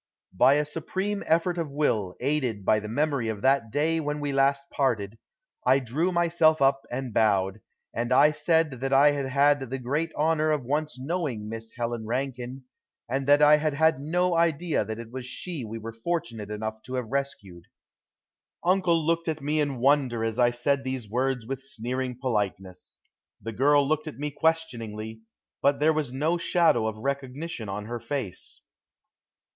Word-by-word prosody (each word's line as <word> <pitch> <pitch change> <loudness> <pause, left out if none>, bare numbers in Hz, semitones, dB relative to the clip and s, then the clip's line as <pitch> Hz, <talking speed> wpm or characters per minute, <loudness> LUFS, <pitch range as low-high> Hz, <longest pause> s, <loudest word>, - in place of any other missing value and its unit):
By 130 +9 +5
a 150 0 +1
supreme 190 +7 -3
effort 170 +2 +2
of 165 -3 -2
will, 110 -10 0
aided 125 -7 -1
by 110 - +4
the 105 - -7
memory 140 0 0
of 105 -2 -5
that 135 -4 +3
day 160 +6 +1
when 150 -1 -2
we 145 -1 -2
last 140 0 +2
parted, 115 -6 -1 0.4
I 130 +2 +5
drew 140 +8 -1
myself 170 -2 +3
up 135 0 +3
and 125 -1 -4
bowed, 100 -2 +2 0.3
and 120 +1 -2
I 150 +4 +6
said 150 -2 +1
that 135 0 -1
I 140 +2 +6
had 140 -2 -2
had 140 -1 +2
the 135 - -3
great 145 +6 -2
honor 155 0 +2
of 150 -5 0
once 150 +1 -1
knowing 135 -6 -3
Miss 115 0 -6
Helen 120 -2 -3
Rankine, 130 +1 -3 0.4
and 135 +2 -2
that 145 +1 +6
I 150 +1 +7
had 150 -1 -1
had 160 -2 +3
no 175 +4 +1
idea 165 -3 +1
that 110 +1 -5
it 115 -1 -9
was 130 -1 -6
she 165 +1 -5
we 115 0 -6
were 115 0 -7
fortunate 115 -5 -3
enough 110 +1 -4
to 130 - -5
have 125 -3 -4
rescued. 100 -11 -4 1.0
Uncle 180 -1 +3
looked 165 +1 0
at 160 -1 -1
me 150 +2 0
in 145 -3 -1
wonder 130 -3 +2
as 115 +1 -2
I 120 -1 +5
said 135 +3 0
these 130 -4 -4
words 125 +2 -1
with 135 +2 -4
sneering 125 0 -4
politeness. 100 -7 -3 0.4
The 115 - -6
girl 140 +4 +4
looked 155 +1 0
at 150 - -7
me 150 +1 -3
questioningly, 115 -9 -2 0.4
but 140 0 +3
there 155 +2 +4
was 150 -5 -2
no 155 +6 0
shadow 165 -11 +3
of 110 -1 -4
recognition 135 0 -4
on 105 +2 -4
her 120 +2 -5
face. 115 -5 -6
135 Hz, 175 wpm, -26 LUFS, 115-150 Hz, 1.0 s, I